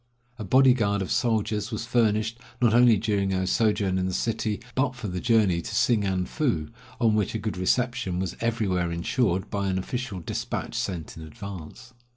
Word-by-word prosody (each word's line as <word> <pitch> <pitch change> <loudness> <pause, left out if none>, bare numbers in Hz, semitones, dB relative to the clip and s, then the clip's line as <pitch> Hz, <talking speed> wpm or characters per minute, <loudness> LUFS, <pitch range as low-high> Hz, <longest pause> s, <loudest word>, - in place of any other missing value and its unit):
A - - -4
body 130 +5 +5
guard 100 -5 0
of 90 - -6
soldiers 110 -3 0
was 115 -1 -4
furnished, 115 -1 +1 0.2
not 120 -3 +3
only 120 -2 +6
during 100 -2 0
our 95 0 0
sojourn 100 -2 +1
in 90 - 0
the 95 - -2
city, 110 -2 -1
but 130 0 0
for 125 -3 -6
the 90 -1 -3
journey 105 -6 +3
to - - -6
Singan 100 -6 +2
foo, 105 - -1 0.3
on 115 -3 +3
which 105 0 0
a - - +2
good 110 -1 -3
reception 120 +1 0
was 90 -1 -2
everywhere 100 -7 0
insured 90 +3 0
by 100 -2 -1
an 95 -1 0
official 110 0 -4
despatch 85 - -4
sent 85 -5 -4
in - - -9
advance. 85 +1 -9
105 Hz, 185 wpm, -26 LUFS, 95-115 Hz, 0.3 s, only